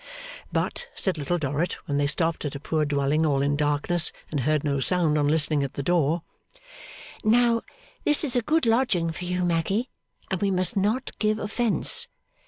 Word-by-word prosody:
But, 485 - -2
said 185 -5 -2
Little 175 +5 -1
Dorrit, 150 +2 -1
when 140 - -1
they 145 - +2
stopped 165 +2 0
at 145 - -4
a - - -5
poor 155 +1 -1
dwelling 145 +2 +1
all 140 -3 +2
in 145 +1 +1
darkness, 150 +3 +1 0.2
and 150 - -1
heard 150 +3 +1
no 140 -2 0
sound 165 +1 +2
on 145 -1 +2
listening 150 -1 +2
at 140 -1 -3
the 140 - -3
door, 165 +1 +1 1.0
'Now, 235 +1 +3 0.4
this 295 +1 +3
is 270 -5 +2
a 245 - +3
good 315 +6 +1
lodging 225 -8 +2
for 180 +2 -6
you, 180 0 -1
Maggy, 180 +8 0 0.4
and 190 - -1
we 200 - +2
must 185 +3 0
not 210 +6 0
give 215 0 +1
offence. 235 - +1
170 Hz, 185 wpm, -25 LUFS, 145-215 Hz, 1.0 s, Now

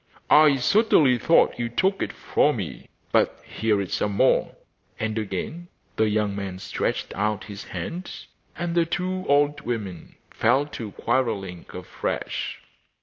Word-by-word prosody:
'I 150 -2 +7
certainly 145 - +4
thought 165 - +3
you 120 -1 -1
took 190 - +1
it - - -1
from - - +1
me; - - -6 0.2
but - - +2
here 110 -2 0
is 95 -2 -3
some 105 - 0
more.' - - +2 0.4
And 110 -1 -2
again 110 - -4 0.3
the 110 -1 +2
young 105 -1 0
man 100 -2 -4
stretched 95 - -3
out 105 -1 -1
his 100 -1 -8
hand; 180 +2 -5 0.5
and 170 0 -2
the 170 -1 +2
two 185 +2 -2
old 145 +1 +3
women 105 -8 -5 0.2
fell 130 +5 +2
to 115 -8 -7
quarrelling 110 -8 -1
afresh. - - -4
120 Hz, 145 wpm, -25 LUFS, 105-155 Hz, 0.5 s, I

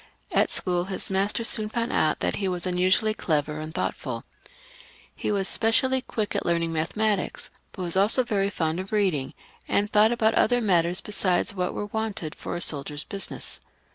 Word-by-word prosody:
At - - +3
school, 175 -1 0
his 190 0 -3
masters 200 +4 +1
soon 215 -1 +3
found 235 +1 -2
out 155 - +2
that - - 0
he 195 - -1
was 180 -1 -2
unusually 185 +4 +2
clever 150 -5 -1
and 155 0 -6
thoughtfoL 130 -6 -3 0.9
He - - -2
was 195 -2 +1
specially 260 +4 +2
quick 215 -5 -3
at - - 0
learning 170 -1 0
mathematics, 200 +6 -1 0.2
but 185 - -6
was 175 0 -1
also 205 +7 +5
very 200 -5 0
fond 165 -3 -1
of 190 +1 -6
reading, 185 -11 0 0.3
and 205 +1 +1
thought 215 +2 +5
about 225 -2 +2
other 245 +1 +3
matters 180 -5 +2
besides 200 -2 +1
what 180 -2 -2
were 205 - -3
wanted 205 -7 -4
for - - -6
a 175 - -4
soldier's 145 -1 -1
business. 200 -1 -4
190 Hz, 175 wpm, -25 LUFS, 170-215 Hz, 0.9 s, also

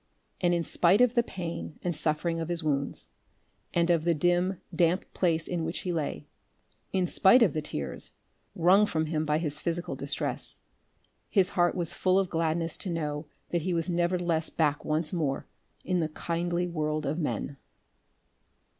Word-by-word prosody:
And 175 -2 +3
in 170 - 0
spite 175 +5 +3
of 250 -1 +5
the 240 - +4
pain 170 -7 -6
and 175 -2 -1
suffering 155 +2 0
of 165 0 -3
his 170 -1 0
wounds, 140 -2 -1 0.6
and 170 0 +2
of 165 -2 +2
the 170 0 +2
dim 175 +4 +1 0.2
damp 175 +1 +2
place 165 -3 +1
in 175 -2 -2
which 165 +2 -3
he 180 - -2
lay; 155 -3 -3 0.7
in 185 -1 +1
spite 210 +7 +6
of 185 -10 +3
the 155 - -1
tears 70 - -4 0.5
wrung 190 +5 +5
from 160 -4 0
him 155 0 -1
by 150 0 +2
his 150 -2 -2
physical 170 +1 -2
distress - - -3 0.7
his 195 -3 +3
heart 175 -1 +2
was 175 -2 -1
full 185 +1 +2
of 195 -2 +1
gladness 165 0 0
to 190 - -4
know 150 -3 -3 0.2
that 170 - +1
he 180 +2 -1
was 165 +1 -1
nevertheless 175 -2 +1
back 150 -3 0
once 155 +1 0
more 150 -6 -1 0.4
in 185 -1 +1
the 160 -2 0
kindly 170 +2 -1
world 155 -3 -2
of 150 +5 -1
men. 145 -3 -2
170 Hz, 170 wpm, -29 LUFS, 155-175 Hz, 0.7 s, spite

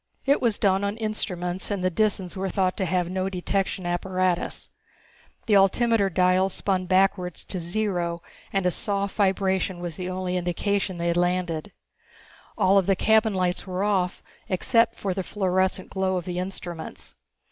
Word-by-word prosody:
It 280 +1 +3
was 230 -4 +2
done 195 -1 +2
on 200 +2 -1
instruments, 185 -5 -1
and 200 -3 -2
the 185 - +2
Disans 195 -2 0
were 190 0 -2
thought 185 -1 +1
to 190 - 0
have 180 0 0
no 185 +1 -1
detection 190 0 -2
apparatus. 180 0 -1 0.7
The 215 - +3
altimeter 200 +1 +4
dials 185 +1 +2
spun 185 -2 -1
backwards 185 -1 +1
to 185 - -3
zero 175 -2 -2 0.3
and 195 -2 0
a 180 - +3
soft 200 +2 -2
vibration 190 -2 +1
was 175 -2 -5
the 185 0 -4
only 185 0 -2
indication 185 +2 -1
they 170 0 -1
had 170 - +1
landed. 175 -3 0 0.9
All 195 +1 +5
of 190 - -2
the 195 - +4
cabin 220 +1 +3
lights 180 +1 0
were 185 +1 -2
off 190 -3 0 0.3
except 230 +5 +2
for 195 -2 -2
the 190 - -2
fluorescent 190 0 -1
glow 190 -1 0
of 175 - -4
the 180 -1 -3
instruments. 180 -3 -6
185 Hz, 165 wpm, -25 LUFS, 180-200 Hz, 0.9 s, All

